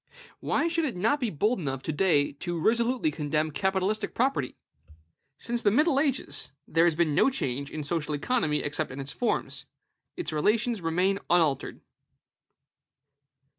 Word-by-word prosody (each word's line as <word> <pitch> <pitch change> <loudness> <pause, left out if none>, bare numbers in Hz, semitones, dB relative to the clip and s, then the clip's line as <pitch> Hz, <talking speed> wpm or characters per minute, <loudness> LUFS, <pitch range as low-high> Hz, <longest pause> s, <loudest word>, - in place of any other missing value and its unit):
Why 330 - 0
should 335 -1 0
it 250 -10 -3
not 225 +11 +2
be 245 -4 0
bold 210 - 0
enough 135 -5 -4
to - - -2
day 150 -3 +2
to 170 +4 -4
resolutely 235 - +2
condemn 155 - -1
capitalistic 190 +4 -1
property? 245 - 0 0.8
Since 235 +5 -3
the 210 - +4
middle 275 +6 +3
ages, 275 -3 -1 0.2
there 165 +2 +3
has 170 -2 +3
been 160 -2 +2
no 270 - +4
change 140 - -2
in 155 - -5
social 150 0 -1
economy 155 - 0
except 145 +1 -2
in 130 - -8
its 135 +1 -4
forms; 245 - -2 0.5
its 355 - -3
relations 215 +7 +1
remain 180 +4 +1
unaltered. 165 -5 +1
180 Hz, 150 wpm, -27 LUFS, 150-235 Hz, 0.8 s, the